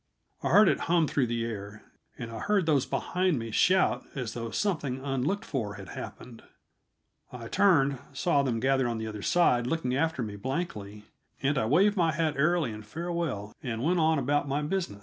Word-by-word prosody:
I - - -1
heard 210 -1 +7
it - - +2
hum 170 -2 +4
through 135 -4 +1
the 115 0 -1
air, 105 -2 -7 0.3
and 115 - -6
I 115 - -6
heard 205 -4 +1
those 145 -5 +2
behind 180 -3 0
me 115 -1 -5
shout 185 - +3
as 125 -5 -4
though 115 -1 -4
something 150 - -1
unlooked 140 +9 -1
for 110 -7 -3
had 95 -2 -10
happened. 120 -2 -9 0.9
I 120 -2 -8
turned, 140 -7 +3
saw 140 +1 +1
them 125 -4 -1
gathered 130 +1 +2
on 120 -1 -2
the 110 - -4
other 105 -1 -6
side 125 - +3
looking 130 -4 -1
after 160 -2 0
me 105 -2 -6
blankly, 105 - -4 0.4
and 140 +2 +2
I 135 - +1
waved 195 - +3
my 165 -3 +2
hat 155 0 0
airily 155 -2 +2
in 110 0 -7
farewell 155 -5 -4
and 115 -2 -4
went 175 +3 +2
on 160 0 +3
about 145 +2 0
my 140 +2 -1
business. 170 - -2
135 Hz, 190 wpm, -28 LUFS, 115-165 Hz, 0.9 s, heard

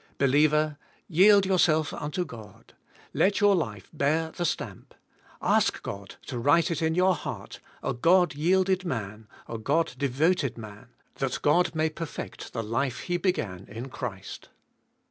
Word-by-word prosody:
Believer, 150 +2 +3 0.3
yield 195 +4 +6
yourself 165 -5 +2
unto 175 +5 -3
God. 115 -8 -13 0.4
Let 200 +2 +2
your 205 -1 +5
life 105 - -3
bear 160 +2 0
the 175 - -3
stamp; - - -4 0.5
ask - - +2
God 100 0 -7
to 125 - -5
write 160 +8 +3
it 165 - -2
in 160 0 +1
your 185 +1 +4
heart, - - -7 0.2
a - - -1
God 175 +8 +3
yielded 185 +5 +2
man, 110 - -5 0.2
a 115 - -5
God 150 +9 0
devoted 140 +1 +1
man, 105 -2 -10 0.3
that 135 -2 -2
God 170 +3 +3
may 155 0 +1
perfect 165 0 -7
the 115 - -3
life 120 +4 -2
He 175 0 -1
beg 185 0 +1
an 90 -2 -5
in 115 +5 -7
Christ. 100 -7 -7
150 Hz, 150 wpm, -27 LUFS, 120-175 Hz, 0.5 s, yield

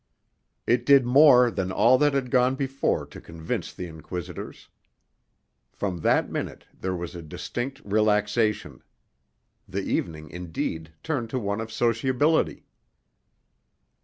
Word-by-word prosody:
It 120 0 +2
did 135 0 +6
more 125 -2 +6
than 95 -1 -2
all 115 +6 +4
that 145 -1 +3
had 130 -3 -1
gone 125 0 +3
before 135 0 -1
to - - -12
convince 80 -1 -5
the 90 - -7
inquisitors. 85 +1 -8 1.0
From 95 -4 -3
that - - +2
minute - - -5
there 95 0 -3
was 85 -1 -5
a 85 - -7
distinct 120 - -5
relaxation; 105 +1 +1 0.9
the - - -3
evening, 80 -3 -3
indeed, 80 -2 -4
turned 130 -8 -2
to 130 - -2
one 100 -1 -2
of 115 - -6
sociability. 130 +6 +1
110 Hz, 125 wpm, -25 LUFS, 90-130 Hz, 1.0 s, did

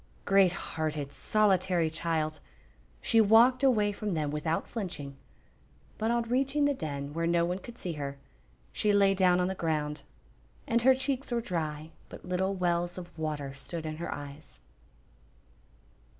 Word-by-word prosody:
Great 195 -2 +5
hearted, 155 -5 -4
solitary 190 -5 +2
child! 155 -1 -1 0.6
She 225 -1 +5
walked 230 +5 +6
away 220 -7 +3
from 205 -2 -3
them 150 -2 -1
without 155 +2 -1
flinching, 170 - -5 0.8
but 220 +1 0
on 235 0 +2
reaching 270 +5 +1
the 285 - +3
Den, 145 - -5
where 165 +1 -1
no 170 0 +3
one 180 +2 -2
could 240 +4 -11
see 180 -7 -4
her 140 -2 -5 0.5
she 210 - +1
lay 200 -1 +5
down 185 -2 +3
on 180 - +2
the 190 - -1
ground, 155 -4 -2 0.6
and 235 +1 +1
her 260 +2 +6
cheeks 270 0 -2
were 240 - +1
dry, 160 -7 -4 0.2
but - - -11
little 190 +2 0
wells 175 -1 0
of 175 -1 -9
water 150 -4 -3
stood 150 +4 -7
in 155 0 -4
her 170 - -4
eyes. 145 - -9
175 Hz, 155 wpm, -29 LUFS, 155-215 Hz, 0.8 s, walked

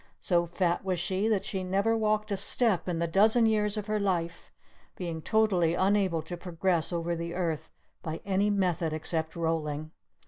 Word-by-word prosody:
So 175 -2 +1
fat 175 0 0
was 185 -2 -1
she 190 +4 -1
that 215 -4 +1
she 190 - -3
had 185 - -5
never 200 +4 +2
walked 215 -1 0
a - - +2
step 210 -4 +1
in 175 - -1
the 170 - 0
dozen 215 +7 +4
years 210 -1 +2
of 210 - -3
her 215 0 -1
life, 170 -4 -2 0.4
being 170 -3 -5
totally 185 -4 +2
unable 190 -4 +1
to 175 +3 -6
progress 175 -1 0
over 170 0 -1
the 170 +1 -5
earth 160 -3 -2 0.3
by 160 0 -5
any 200 +1 +1
method 180 -5 0
except 160 +1 -2
rolling. 155 -2 -2
180 Hz, 180 wpm, -29 LUFS, 165-205 Hz, 0.4 s, dozen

